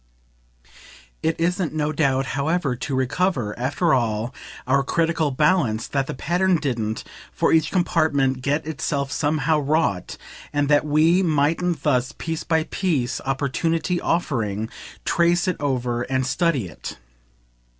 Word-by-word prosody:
It 160 0 0
isn't, 175 0 0
no 150 -1 0
doubt, 135 -3 +1
however 140 0 0
to 135 +2 -3
recover, 130 - 0
after 145 +7 +1
all, 115 -2 0 0.3
our 140 +2 +3
critical 165 +1 +1
balance 135 -6 +2
that 135 -1 -1
the - - -4
pattern 180 +6 +1
didn't, 115 -8 -2 0.3
for - - +1
each 160 -1 +3
compartment, 145 -7 +1
get 145 +4 0
itself 140 -1 -2
somehow 155 0 +1
wrought, 145 - 0 0.3
and 145 -1 0
that 145 +1 +3
we 160 +5 +4
mightn't 160 0 +1
thus, 125 +1 +1
piece 165 -1 -3
by 160 -1 +1
piece, 155 -8 -1
opportunity 160 +6 0
offering, 110 - -1 0.4
trace 175 +1 +2
it 180 - 0
over 125 -4 -1
and 130 +1 -1
study 140 - +1
it. 85 - -8
145 Hz, 130 wpm, -23 LUFS, 130-165 Hz, 0.4 s, we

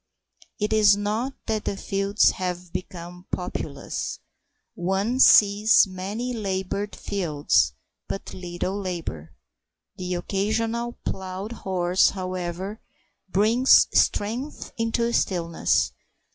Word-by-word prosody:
It 210 +1 0
is 210 -2 +6
not 220 +6 -2
that 220 -2 -2
the 195 - -2
fields 195 +1 +2
have 180 -1 -5
become 180 0 -7
populous. 180 - -4 0.6
One 195 +8 -1
sees 210 -1 +7
many 200 +6 -4
laboured 200 -1 -3
fields, 150 - +1 0.3
but 195 - -5
little 180 +2 -4
labour. 160 - -5 0.6
The 180 0 -3
occasional 225 +6 -1
plough 190 +2 -4
horse, 185 -5 +2
however, 185 +2 -4 0.5
brings 225 +7 +5
strength 240 +8 0
into 230 +1 0
the 235 0 0
stillness. 170 -6 +1
195 Hz, 100 wpm, -25 LUFS, 180-215 Hz, 0.6 s, sees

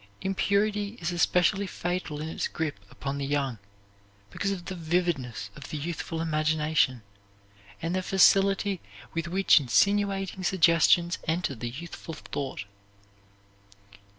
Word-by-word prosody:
Impurity 205 +2 0
is 175 0 -2
especially 180 +3 +2
fatal 175 -4 -3
in 155 - -4
its 160 - -2
grip 155 -8 -3
upon 140 +5 -4
the 140 - -2
young, 135 -5 -1 0.7
because 200 - -2
of 180 -3 -5
the 190 - -4
vividness 165 - -1
of 145 -1 -10
the 155 - -4
youthful 165 +1 -4
imagination 155 -5 +1 0.8
and 165 +1 -1
the 185 - 0
facility 195 0 +4 0.3
with 165 0 -2
which 190 -1 +5
insinuating 195 +7 +1
suggestions 170 -1 +4
enter 160 -2 0
the 120 -1 -5
youthful 165 +4 -8
thought. 140 -9 -5
170 Hz, 125 wpm, -28 LUFS, 150-190 Hz, 0.8 s, which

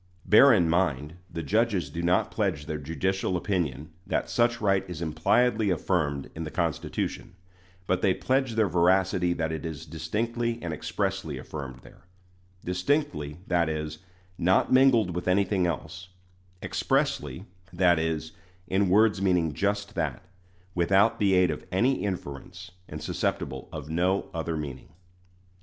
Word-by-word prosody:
Bear 135 +6 +7
in 90 -8 +4
mind, 80 -4 0 0.2
the 85 - -5
judges 110 -3 +1
do 85 - -4
not 90 +2 +2
pledge 90 -9 -1
their 80 -1 -4
judicial 90 +5 -1
opinion 80 -6 -2 0.2
that - - -1
such 120 0 +2
right 95 -2 +2
is 85 -3 -6
impliedly 105 +8 +2
affirmed 80 -5 0
in 80 - -5
the 80 - -5
Constitution; 85 +1 -3 0.5
but 90 0 0
they 95 - +3
pledge 130 -3 0
their 110 -2 +3
veracity 90 +1 +2
that 80 -2 -2
it 80 -2 -4
is 80 -2 -6
"distinctly 115 +10 -2
and 85 -2 -3
expressly" 90 -1 -3
affirmed 65 -1 -7
there - - -18 0.6
"distinctly," 90 - -1
that 85 -2 +1
is, 75 0 -4 0.4
not 95 +8 +3
mingled 120 -9 +4
with 90 +1 -4
anything 95 -1 +2
else 90 +2 -5 0.5
"expressly," 95 - -1 0.3
that 85 -2 +3
is, 80 0 -2 0.4
in 95 +1 +1
words 105 +1 +4
meaning 90 -5 +2
just 100 +4 -1
that, 80 -8 -2 0.5
without 95 +6 +3
the 100 -3 +3
aid 90 -1 +4
of - - -6
any 125 +8 +2
inference, 90 0 -6 0.2
and - - -7
susceptible 65 -1 -3
of 75 -2 -7
no 90 +4 0
other 80 -1 -2
meaning. 70 -4 -6
90 Hz, 145 wpm, -27 LUFS, 80-100 Hz, 0.6 s, Bear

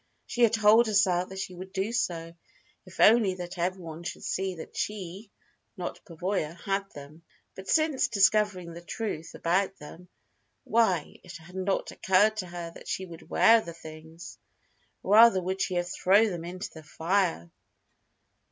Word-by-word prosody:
She 245 - -4
had 230 -2 +5
told 220 +2 +5
herself 190 -4 +2
that 190 - -9
she 190 -1 -5
would 185 +2 -9
do 195 +3 -2
so, 165 -8 -2 0.5
if - - -14
only 215 -4 +5
that 175 0 -7
everyone 170 -2 -3
should 175 - -7
see 190 -1 -2
that 160 - -10
she, 200 0 -5 0.5
not 180 - -6
Pavoya, 170 -2 -3
had 195 +1 -3
them. 145 +3 -11 0.3
But 190 0 -10
since 310 -5 +2
discovering 200 -5 +2
the 170 - -9
truth 175 -3 -5
about 190 +3 0
them 165 +4 -12 0.6
why, 190 -9 +1
it 175 -2 -10
had 165 +2 -16
not 190 +1 -1
occurred 205 +3 +2
to 185 -4 -3
her 170 -1 -7
that - - -13
she 190 - -3
could 165 -2 -13
wear 230 0 +5
the 170 -5 -8
things! 160 +1 -11 0.6
Rather 215 0 +6
would 190 +1 -3
she 185 - -1
have 175 0 -1
thrown 205 +3 +4
them 170 -2 -5
into 185 +3 -6
the 160 - -11
fire. 165 - -1
185 Hz, 160 wpm, -28 LUFS, 170-205 Hz, 0.6 s, Rather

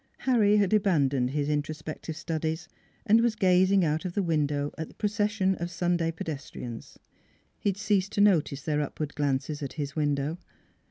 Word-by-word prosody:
Harry 215 -5 +4
had 200 -1 +2
abandoned 140 -11 +2
his 145 +1 -1
introspective 155 +1 -3
studies 160 0 -3 0.4
and 225 +1 +5
was 235 -2 +2
gazing 185 -1 +4
out 155 +1 0
of 180 -2 -4
the 200 - 0
window 145 -3 0
at 160 - -5
the - - -17
procession 210 -2 +1
of 170 +1 -3
Sunday 175 -1 0
pedestrians. 140 -7 -7 0.6
He - - +1
had 195 - -2
ceased 200 -2 +1
to 205 - +2
notice 155 -9 +3
their 150 -1 0
upward 150 +1 -4
glances 145 +1 -1
at 140 - -5
his 145 -3 -4
window. 145 +2 0
160 Hz, 165 wpm, -28 LUFS, 145-195 Hz, 0.6 s, and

